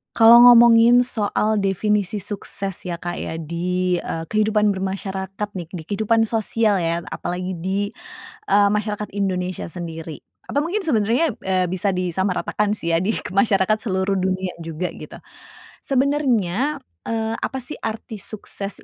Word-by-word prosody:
Kalau 230 Hz, +1 st, +8 dB
ngomongin 235 Hz, 0 st, +7 dB
soal 215 Hz, -2 st, 0 dB
definisi 200 Hz, 0 st, 0 dB
sukses 195 Hz, -2 st, -5 dB
ya 175 Hz, -, -2 dB
Kak 175 Hz, +1 st, -5 dB
ya, -, -, -4 dB
di 175 Hz, +3 st, -1 dB
eee, 165 Hz, -1 st, -4 dB
kehidupan 215 Hz, -1 st, +2 dB
bermasyarakat 195 Hz, +1 st, -4 dB
nih, 180 Hz, -5 st, -6 dB
di 165 Hz, -, -6 dB
kehidupan 220 Hz, +5 st, +1 dB
sosial 220 Hz, -2 st, +1 dB
ya, 170 Hz, 0 st, -1 dB
apalagi 180 Hz, +2 st, -4 dB
di, 195 Hz, +4 st, -2 dB, 0.6 s
eee, 200 Hz, 0 st, +4 dB
masyarakat 210 Hz, 0 st, -2 dB
Indonesia 185 Hz, -3 st, -2 dB
sendiri. 165 Hz, -3 st, -7 dB, 0.2 s
Atau 285 Hz, -, 0 dB
mungkin 355 Hz, +6 st, -1 dB
sebenernya, 235 Hz, +2 st, +2 dB
eee, 185 Hz, -1 st, +1 dB
bisa 185 Hz, +3 st, 0 dB
disamaratakan 190 Hz, +3 st, -1 dB
sih 170 Hz, -5 st, -1 dB
ya, 165 Hz, -, +1 dB
di 215 Hz, -, +1 dB, 0.2 s
masyarakat 195 Hz, 0 st, +2 dB
seluruh 195 Hz, -3 st, -1 dB
dunia 185 Hz, -1 st, -1 dB
juga 165 Hz, +2 st, -3 dB
gitu. -, -, -10 dB, 0.6 s
Sebenernya, 270 Hz, -1 st, 0 dB, 0.2 s
eee, 225 Hz, 0 st, -1 dB
apa 265 Hz, -, -3 dB
sih 300 Hz, -, -8 dB
arti 220 Hz, -1 st, -5 dB
sukses 200 Hz, 0 st, -7 dB
200 Hz, 135 wpm, -21 LUFS, 185-220 Hz, 0.6 s, Kalau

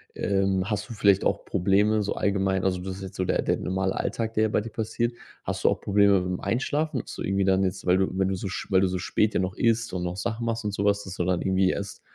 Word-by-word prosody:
Ähm, 95 Hz, 0 st, 0 dB
hast 105 Hz, 0 st, -2 dB
du -, -, -5 dB
vielleicht 100 Hz, -2 st, +3 dB
auch -, -, 0 dB
Probleme 105 Hz, +4 st, +2 dB
so 100 Hz, -, -2 dB
allgemein 95 Hz, -1 st, 0 dB
also, 90 Hz, -1 st, +1 dB
das 95 Hz, 0 st, -5 dB
ist -, -, -10 dB
jetzt 95 Hz, -, -8 dB
so 95 Hz, -, -1 dB
der -, -, +1 dB
der -, -, 0 dB
normale 95 Hz, 0 st, -1 dB
Alltag, 115 Hz, -1 st, -2 dB
der 110 Hz, 0 st, +3 dB
bei 105 Hz, -, +1 dB
dir 115 Hz, -, -7 dB
passiert. 115 Hz, +2 st, -2 dB, 0.3 s
Hast -, -, -4 dB
du -, -, +5 dB
auch -, -, -1 dB
Probleme 100 Hz, -1 st, +4 dB
mit 90 Hz, -, -3 dB
dem -, -, -12 dB
Einschlafen, 145 Hz, +2 st, -1 dB
so -, -, -6 dB
irgendwie 95 Hz, 0 st, +1 dB
dann 95 Hz, 0 st, +3 dB
jetzt, 95 Hz, +1 st, -2 dB
weil 90 Hz, +1 st, +4 dB
du, 95 Hz, -, +2 dB
wenn 95 Hz, 0 st, 0 dB
du 95 Hz, -, -1 dB
so 95 Hz, -, -4 dB
sch 95 Hz, -, -5 dB
weil 95 Hz, 0 st, +5 dB
du 95 Hz, -, +3 dB
so 90 Hz, 0 st, -2 dB
spät 105 Hz, +3 st, +1 dB
ja -, -, +1 dB
noch 95 Hz, 0 st, -2 dB
isst 115 Hz, -2 st, +1 dB
und 90 Hz, -1 st, -2 dB
noch 90 Hz, +1 st, -3 dB
Sachen 115 Hz, +4 st, -3 dB
machst 115 Hz, -1 st, -2 dB
und 105 Hz, -, -1 dB
sowas, 100 Hz, 0 st, +1 dB
dass 95 Hz, -1 st, -7 dB
du 90 Hz, -, -1 dB
dann 90 Hz, -1 st, +1 dB
irgendwie 95 Hz, 0 st, +2 dB
erst 100 Hz, -1 st, -5 dB
95 Hz, 275 wpm, -26 LUFS, 95-105 Hz, 0.3 s, du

